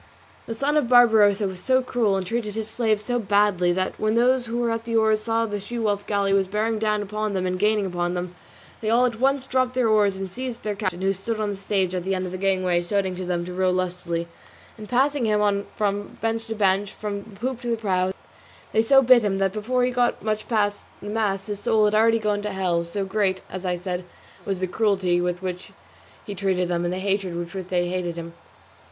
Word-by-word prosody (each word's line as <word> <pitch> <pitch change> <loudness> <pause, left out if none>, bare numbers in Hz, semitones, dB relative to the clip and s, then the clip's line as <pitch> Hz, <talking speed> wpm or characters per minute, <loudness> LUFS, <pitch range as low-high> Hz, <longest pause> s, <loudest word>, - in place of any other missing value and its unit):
The 230 - -4
son 285 +6 +1
of 250 -6 +1
Barbarossa 220 -5 +5
was 190 -1 -6
so 260 +5 +2
cruel, 230 -5 +1
and 190 -1 -2
treated 215 +1 -3
his 220 -1 -3
slaves 220 -2 0
so 245 -1 0
badly, 200 -4 +2
that, 185 +1 -2
when 215 +1 +1
those 245 +1 +3
who 230 +1 -3
were 240 -1 0
at 230 0 -2
the 230 0 -3
oars 220 -1 +3
saw 225 +1 0
that 215 - -7
the 205 - -2
She 220 +5 -6
wolf 205 -3 -1
galley 200 -1 +1
was 195 -1 +2
bearing 215 +3 -1
down 210 -1 0
upon 210 0 -3
them 185 -1 -1
and 185 0 -2
gaining 210 0 +2
upon 175 -1 -2
them, 180 0 -4 0.5
they 215 - -1
all 240 +3 +4
at 230 -2 -2
once 270 +1 +2
dropped 255 -1 0
their 250 -2 +2
oars 205 -3 +3
and 195 0 -4
seized 245 +4 -6
their 210 - -1
captain 185 -3 -3
who 195 0 +2
stood 215 +4 -4
on 210 -1 -1
the - - -4
stage 195 -1 -1
at 180 -1 -2
the 190 +1 -1
end 185 0 -2
of 180 - -5
the 185 - -5
gangway 185 -2 +1
shouting 190 +1 -1
to 185 0 -5
them 175 -1 -2
to 180 - -6
row 185 0 +1
lustily; 180 -2 -2 0.5
and 215 -2 -10
passing 270 +1 +2
him 210 -1 +2
on 200 -1 +1
from 205 -1 -2
bench 225 0 -2
to 225 - -4
bench, 200 -1 +1
from 205 -1 -5
the 200 -1 -15
poop 250 +1 -3
to 245 - -6
the 230 -1 0
prow, 190 -4 0 0.6
they 220 - +4
so 270 +4 +5
bit 250 -1 +7
him 195 -2 0
that 195 -1 0
before 245 +4 0
he 250 - +2
had - - -10
got 245 -1 +1
much 215 0 -2
past 205 -3 0 0.2
the 205 - -7
mast 200 -3 -1
his 205 -1 -5
soul 220 -1 +3
had 210 - +2
already 225 +1 +4
got 210 -2 -1
to 210 - -3
hell; 185 -3 0
so 195 +4 -3
great, 190 -1 0
as 185 0 -5
I 180 - +1
said, 180 0 -4 0.4
was 195 -2 -2
the 185 - 0
cruelty 185 -3 +1
with 180 +1 -2
which 180 -1 -5 0.5
he 205 - -5
treated 185 -2 0
them, 175 0 0
and 175 - -1
the 180 - -2
hatred 195 -2 -1
with 170 0 -5
which 190 -2 -5
they 175 -1 0
hated 175 -2 -3
him. 170 0 -7
205 Hz, 245 wpm, -24 LUFS, 185-225 Hz, 0.6 s, bit